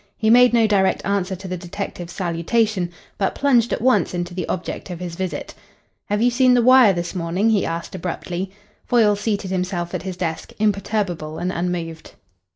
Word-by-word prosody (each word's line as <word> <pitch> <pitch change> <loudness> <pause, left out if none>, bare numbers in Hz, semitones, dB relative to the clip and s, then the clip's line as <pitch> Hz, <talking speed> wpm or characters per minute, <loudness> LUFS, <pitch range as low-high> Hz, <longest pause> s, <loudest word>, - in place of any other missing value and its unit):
He 220 0 +2
made 245 +1 +7
no 230 -1 +4
direct 195 -3 +2
answer 195 -2 0
to 190 +1 -9
the 185 0 -3
detective's 175 0 -6
salutation, 180 +3 0 0.3
but 195 - 0
plunged 250 -4 +3
at - - -2
once 255 -7 +2
into 175 0 -3
the 180 -2 -4
object 185 +1 -4
of 175 -2 -6
his 180 -2 -5
visit. 185 +1 -4 0.6
"Have 210 +2 +1
you 245 - +4
seen 250 0 +4
the 245 - +4
Wire 255 -3 +7
this 175 -2 -3
morning?" 180 +5 0
he 210 -3 +2
asked 165 0 -4
abruptly. 180 +1 -4 0.3
Foyle 220 -4 +3
seated 205 -2 -2
himself 180 -2 -2
at - - -2
his 185 -1 -6
desk, 165 -3 -4
imperturbable 200 -6 -1
and 180 - -2
unmoved. 170 -2 -4
190 Hz, 180 wpm, -21 LUFS, 175-220 Hz, 0.6 s, made